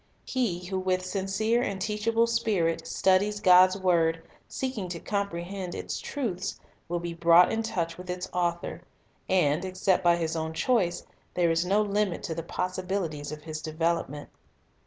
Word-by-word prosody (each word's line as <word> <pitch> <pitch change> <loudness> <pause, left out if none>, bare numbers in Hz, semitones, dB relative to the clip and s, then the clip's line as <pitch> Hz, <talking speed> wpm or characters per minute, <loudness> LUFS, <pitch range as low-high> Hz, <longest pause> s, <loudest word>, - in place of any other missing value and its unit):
He 195 -9 -1
who 190 +1 -2
with 185 0 0
sincere 200 +5 0
and 200 -5 -2
teachable 225 +3 +1
spirit 220 -8 0
studies 200 +2 +2
God's 185 -1 +6
word, 165 -3 +2 0.2
seeking 250 -9 -4
to 170 -1 -5
com 200 +1 -1
prehend 180 +1 -5
its - - -4
truths, 200 -9 -3 0.3
will 175 - 0
be 170 0 -4
brought 170 +1 +6
in 225 - 0
touch 170 -6 -3
with 180 0 -9
its 180 0 -3
Author; 175 -1 -1 0.5
and, 155 -5 +2
except 185 0 +1
by 175 -1 +5
his 165 -1 -2
own 160 0 -2
choice, 185 -2 +1 0.3
there 175 -2 +3
is 165 +2 +1
no 205 +3 +3
limit 205 -3 -1
to 165 - -3
the 165 - -4
possibilities 180 -4 -3
of 150 0 -8
his 155 -1 -6
development. 160 -2 -2
180 Hz, 160 wpm, -28 LUFS, 170-200 Hz, 0.5 s, God's